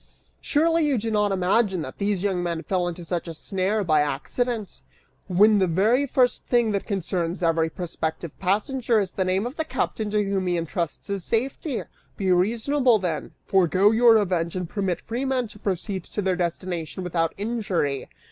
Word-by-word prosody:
Surely 325 +2 +2
you 290 -4 +2
do 225 +1 -2
not 210 -1 +2
imagine 190 -1 +1
that 130 - -9
these 200 -2 0
young 190 -3 0
men 170 -2 -2
fell 180 +2 0
into 175 0 -6
such 175 0 -3
a 165 - -6
snare 195 +5 -1
by 155 -4 +3
accident, 210 - -2 0.5
when 205 +3 +5
the 190 - +3
very 220 - +2
first 250 -1 +2
thing 240 -3 +3
that 200 -1 -2
concerns 180 -3 -2
every 165 -1 +2
prospective 160 -2 -4
passenger 220 +5 +1
is 195 -3 -1
the 190 - -1
name 185 +3 0
of 250 +5 -6
the 320 - 0
captain 220 -8 -2
to 210 0 +1
whom 195 -2 -1
he 175 -1 +1
intrusts 170 +1 -3
his 200 -3 -3
safety! 260 - -1 0.3
Be 190 -2 +1
reasonable, 230 +7 +3
then; 175 -6 -3
forego 190 +2 +4
your 230 0 +6
revenge 180 -5 +1
and 180 -2 -3
permit 190 -2 -2
free 235 +4 -3
men 260 -3 0
to 210 - -14
proceed 190 -1 -2
to 210 - -4
their 185 -1 +1
destination 175 0 -3
without 165 -2 -1
injury. 195 - -2
195 Hz, 180 wpm, -24 LUFS, 175-225 Hz, 0.5 s, your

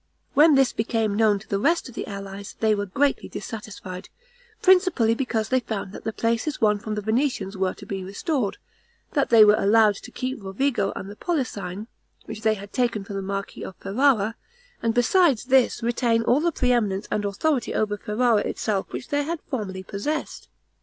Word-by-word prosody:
When 300 +1 +6
this 270 -2 +3
became 220 -2 0
known 215 -1 +3
to 200 +1 -13
the 195 - -1
rest 335 +8 +1
of 250 - -11
the - - -5
allies, 200 0 -7
they 220 -1 +3
were 205 -1 -2
greatly 275 +9 0
dissatisfied, 200 -5 -7 0.5
principally 360 - +4
because 230 -3 -2
they 260 - +3
found 215 -5 -5
that - - -10
the 225 - -1
places 230 +6 -1
won 210 -2 +3
from 215 +1 -4
the 210 - -4
Venetians 220 -3 0
were 190 -1 -1
to - - -12
be 195 -1 -4
restored; 205 - -2 0.6
that 280 - +1
they 225 -2 +8
were 210 - +6
allowed 215 +1 +4
to 245 - -11
keep 255 -1 -4
Rovigo 200 +1 0
and 190 - -6
the 205 - -9
Polesine, 210 - -3 0.4
which 220 0 -7
they 220 0 +2
had 200 0 -11
taken 240 -5 0
from 200 0 -7
the 195 - -2
marquis 195 0 -5
of 190 - -7
Ferrara, 220 0 +2 0.5
and 230 0 0
besides 270 - +3
this 255 -2 +3
retain 235 -1 +1
all 245 +4 +3
the 340 +2 +1
pre 250 -5 +1
eminence 210 -4 0
and 210 - 0
authority 245 +7 0
over 210 -1 0
Ferrara 215 +2 +1
itself 200 -2 -2
which 245 - -6
they 290 0 +1
had 325 +3 -3
formerly 190 -7 -3
possessed. 250 +12 -4
220 Hz, 190 wpm, -24 LUFS, 200-255 Hz, 0.6 s, they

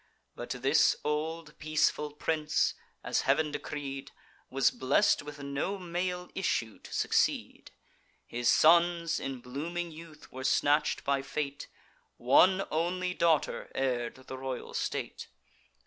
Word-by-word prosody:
But - - -7
this - - +3
old 155 +1 -3
peaceful 155 -1 +1
prince, 155 0 0 0.3
as - - +1
Heav'n 155 -1 +2
decreed, 140 -2 -5 0.4
Was 135 0 +3
blest 140 +10 +3
with 145 -1 -9
no 140 +8 -2
male 180 0 -3
issue 115 - -1
to - - -13
succeed: - - 0 0.6
His 120 0 0
sons 170 0 +4
in 135 -2 -5
blooming 165 +7 -4
youth 155 -1 -13
were 130 0 -7
snatch'd 145 +3 +2
by 140 0 +1
fate; 140 +1 -4 0.5
One 185 +10 +5
only 180 +3 0
daughter 165 -3 +1
heir'd 125 -3 -1
the 130 - -7
royal 130 -1 -5
state. - - -3
150 Hz, 120 wpm, -30 LUFS, 135-170 Hz, 0.6 s, One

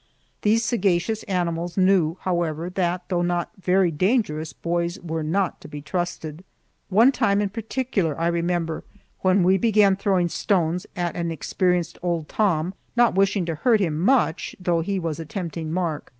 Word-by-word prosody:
These 225 +2 +2
sagacious 210 -1 +1
animals 175 -2 -2
knew, 185 -3 +3
however, 170 -2 -1
that, 180 -1 -1
though 175 -2 +1
not 175 0 -1
very 185 -1 +3
dangerous, 160 - 0
boys 170 +5 -2
were 165 -2 -4
not 175 +4 -1
to - - -10
be 150 0 -7
trusted. 160 0 -4 0.5
One 225 +7 +6
time 225 -6 +1
in 205 -1 0
particular 215 - -2
I 165 - 0
remember, 170 -1 -1 0.4
when 185 0 +3
we 190 +2 +4
began 210 -2 +4
throwing 190 -3 +1
stones 175 -2 0
at 175 -1 -2
an 170 -1 -2
experienced 180 +2 -1
old 170 -3 -1
Tom, 180 -3 0 0.2
not 240 -1 +4
wishing 195 0 +2
to 165 - -2
hurt 225 - +2
him 160 -6 0
much, 210 -4 +1
though 175 -2 +1
he 195 +4 -2
was 165 -3 -3
a - - -4
tempting 165 -2 -5
mark. 165 -4 -2
175 Hz, 165 wpm, -23 LUFS, 165-195 Hz, 0.5 s, One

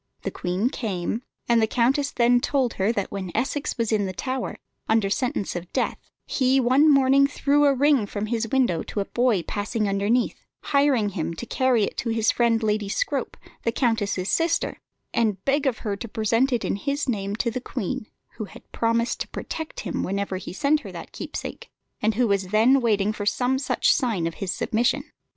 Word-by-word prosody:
The - - -2
Queen 185 +8 -1
came, 205 -1 -2 0.3
and 235 -1 +4
the 220 - +3
countess 265 +5 +2
then 245 -1 +3
told 260 -4 +1
her 195 +3 +1
that 200 -4 -2
when 190 -3 -4
Essex 285 +2 -1
was 230 -2 0
in 205 -3 +1
the 185 - -4
Tower, 255 +6 -3 0.3
under 220 -3 +2
sentence 225 -4 -1
of 175 0 -6
death, - - 0 0.3
he 260 0 +2
one 265 +5 +5
morning 275 0 +5
threw 290 0 +2
a 280 - +5
ring 275 -5 +3
from 205 +1 -3
his 225 0 -1
window 240 -10 +1
to - - -5
a 200 - 0
boy 240 -7 +1
passing 215 +3 -2
underneath, 200 +5 0 0.2
hiring 280 -7 +2
him 170 -3 -3
to 240 - -6
carry 255 -2 +2
it - - -3
to 235 - -2
his 225 -1 +2
friend 235 -1 +2
Lady 210 -1 0
Scrope, - - -2 0.2
the 230 - 0
countess's 225 -6 0
sister, 330 0 0 0.3
and 210 -5 0
beg 280 +1 +2
of 250 - 0
her 205 -2 0
to 215 +4 -7
present 230 +5 +1
it 240 -3 0
in - - -1
his 280 +6 -2
name 200 -4 -1
to 235 +1 -1
the 255 +2 -4
queen, 210 -2 -4 0.3
who 215 - -3
had - - -15
promised 230 +1 0
to - - -3
protect 320 -1 -6
him 180 - -3
whenever 195 0 -2
he 185 - -7
sent 285 - +2
her - - -9
that - - -9
keepsake, - - -7 0.3
and 215 0 +1
who 245 +1 +2
was 200 -2 +1
then 225 +7 +4
waiting 210 -3 +2
for 205 -1 -4
some 255 +4 +1
such - - +2
sign 230 - 0
of 165 - -2
his 190 -2 -1
submission. 235 +5 0
230 Hz, 200 wpm, -24 LUFS, 205-260 Hz, 0.3 s, one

